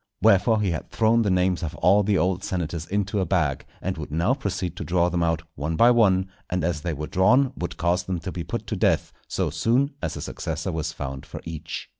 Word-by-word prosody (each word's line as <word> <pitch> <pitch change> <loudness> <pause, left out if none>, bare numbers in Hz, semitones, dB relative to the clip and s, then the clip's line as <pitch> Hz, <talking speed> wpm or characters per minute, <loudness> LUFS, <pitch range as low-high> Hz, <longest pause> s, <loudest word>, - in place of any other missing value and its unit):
Wherefore 105 +3 +4
he 100 -4 +1
had 80 - -4
thrown 115 +1 +3
the 105 - +1
names 90 -1 +2
of 80 -1 -4
all 100 +3 +4
the 100 -1 +2
old 90 +1 0
senators 85 -2 -3
into 100 +1 -1
a 95 - +1
bag, 80 -7 0 0.2
and 95 -3 -2
would 75 - -6
now 85 - +1
proceed 95 - -3
to - - -4
draw 85 0 +2
them 90 0 -1
out 80 -1 +1
one 75 +3 -3
by 120 +7 +6
one, 95 -6 +4 0.2
and 90 -2 -1
as 80 -2 -1
they 90 - -2
were 75 +2 -4
drawn 125 - +3
would 85 - -5
cause 90 +2 +1
them 95 -1 -2
to 95 - -5
be 85 - -4
put 85 - -4
to - - -3
death, - - +1
so - - -1
soon 130 +5 +1
as - - -3
a - - -5
successor - - -4
was 80 0 -2
found 70 -4 -6
for - - -8
each. 80 0 -6
90 Hz, 235 wpm, -25 LUFS, 80-100 Hz, 0.2 s, by